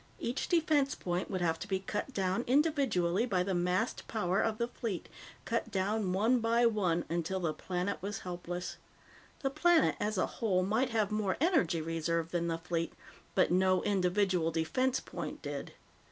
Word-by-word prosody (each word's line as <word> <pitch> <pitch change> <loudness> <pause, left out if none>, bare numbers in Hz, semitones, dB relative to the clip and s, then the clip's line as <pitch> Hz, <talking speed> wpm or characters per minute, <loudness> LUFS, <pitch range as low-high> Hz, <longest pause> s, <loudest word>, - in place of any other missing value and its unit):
Each 245 +3 -2
defense 310 -5 +2
point 175 +1 -2
would 185 -3 -2
have 165 -1 +1
to - - -6
be 195 -2 +1
cut 205 +6 -4
down 195 0 0
individually 250 - +2
by 185 -5 +1
the 190 +1 -1
massed 180 +5 0
power 195 -3 0
of 220 -1 0
the 235 0 0
fleet, 230 -6 -4 0.4
cut - - -1
down 195 0 0
one 225 +7 +3
by 230 +1 +3
one 185 -7 +1
until 170 +3 -1
the 165 -4 -1
planet 180 +5 -3
was 205 +2 -4
helpless. 175 0 -5 0.6
The 270 - 0
planet 330 +3 +4
as 210 0 -1
a - - +3 0.2
whole 190 -5 +2
might 225 +6 +1
have 215 -3 +1
more 210 -3 0
energy 315 - +2
reserve 165 0 -1
than 170 -1 0
the 165 -1 -1
fleet, 165 -1 -2 0.4
but - - +3
no 185 0 +3
individual 185 -3 +2
defense 245 +12 0
point - - -7
did. - - -5
190 Hz, 170 wpm, -32 LUFS, 175-230 Hz, 0.6 s, planet